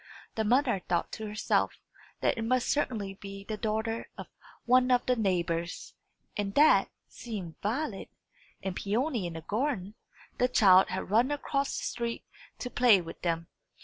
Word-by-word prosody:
The 220 - -1
mother 245 -1 +2
thought 170 -1 0
to 220 -1 -5
herself 210 +1 0 0.5
that - - +2
it 230 - -4
must 250 +2 +1
certainly 220 -9 -1
be 195 0 -9
the 215 +2 -4
daughter 220 +1 -2
of - - -6 0.4
one 250 +1 +4
of 250 -1 +3
the 250 - +2
neighbours, 175 -5 -1 0.4
and 200 -1 -3
that, 300 +2 +5 0.2
seeing 200 -8 -7
Violet, 225 0 -2 0.5
and 190 -1 -3
Peony 225 - -1
in 170 - -6
the 165 - -6
garden, 210 - -2 0.5
the 250 - +4
child 190 -6 +6
had 190 +1 -4
run 235 +5 +4
across 280 -1 -1
the - - -4
street 235 -1 -3 0.3
to 250 - -5
play 240 -5 +5
with 165 -2 -9
them. 165 -1 -1
215 Hz, 160 wpm, -29 LUFS, 195-250 Hz, 0.5 s, child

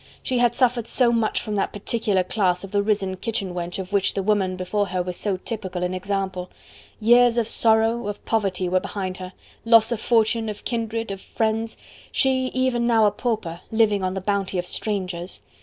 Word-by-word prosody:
She 255 -1 0
had 240 -1 +3
suffered 245 -3 +2
so 245 -1 +3
much 230 -2 +1
from 215 - -4
that - - 0
particular 205 -2 0
class 180 -2 0
of 195 - -8
the 205 -1 +2
risen 200 -3 0
kitchen 200 -2 -3
wench 175 0 -4
of 190 +1 -6
which 200 -1 +2
the 195 - -1
woman 195 -2 +1
before 185 +3 -1
her 180 -1 -1
was 180 0 -4
so 200 0 -1
typical 185 -3 -4
an 180 0 -1
example: 190 -1 -3 0.5
years 240 +2 +5
of 230 -2 +2
sorrow, 225 0 +2
of 205 - -6
poverty 195 -5 0
were 185 +1 +2
behind 185 -1 -4
her: 185 0 -8 0.3
loss 230 0 +5
of 235 - -1
fortune, 225 -1 +2
of 210 - -7
kindred, 225 -2 -2
of 195 -1 -6
friends 225 0 -1 0.3
she, 260 -1 +2
even 255 -2 0
now 225 -2 +4
a 205 - +4
pauper, 205 -7 -3
living 220 -3 +3
on 185 0 -1
the 190 - -3
bounty 195 -1 -1
of 175 - -1
strangers. 180 - -4
205 Hz, 195 wpm, -23 LUFS, 185-230 Hz, 0.5 s, years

